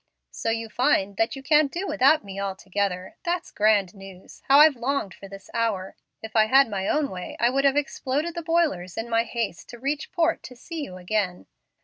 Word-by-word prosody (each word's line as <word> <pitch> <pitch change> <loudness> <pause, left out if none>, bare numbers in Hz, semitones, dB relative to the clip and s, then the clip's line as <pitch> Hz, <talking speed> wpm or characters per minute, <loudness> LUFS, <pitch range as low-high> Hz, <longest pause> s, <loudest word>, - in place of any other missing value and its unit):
"So - - -3
you 225 0 -1
find 215 -5 +1
that 225 +4 +1
you 270 - -9
can't 300 0 +4
do 360 +3 -3
without 295 - +3
me 195 -1 -7
altogether? 195 -1 -3
That's 350 -1 -2
grand 205 -3 +2
news. 195 -2 -13
How 275 - +6
I've 300 -1 +7
longed 245 -4 -2
for 195 - -12
this 195 0 -12
hour! 210 -5 -1 0.3
If 220 0 -9
I'd 215 -1 +4
had 270 +1 +6
my 195 -1 -2
own 295 -1 0
way 180 -1 -7
I 235 +1 +3
would 275 +1 +1
have 275 +1 +4
exploded 290 +3 -1
the 340 - -4
boilers 315 - 0
in 230 +1 -4
my 230 0 +2
haste 230 -6 -4
to 240 - -10
reach 280 +4 -3
port 340 -2 +1
to 250 - -11
see 320 +6 -7
you 185 -10 -7
again. 185 -1 -2
230 Hz, 210 wpm, -25 LUFS, 195-285 Hz, 0.3 s, I've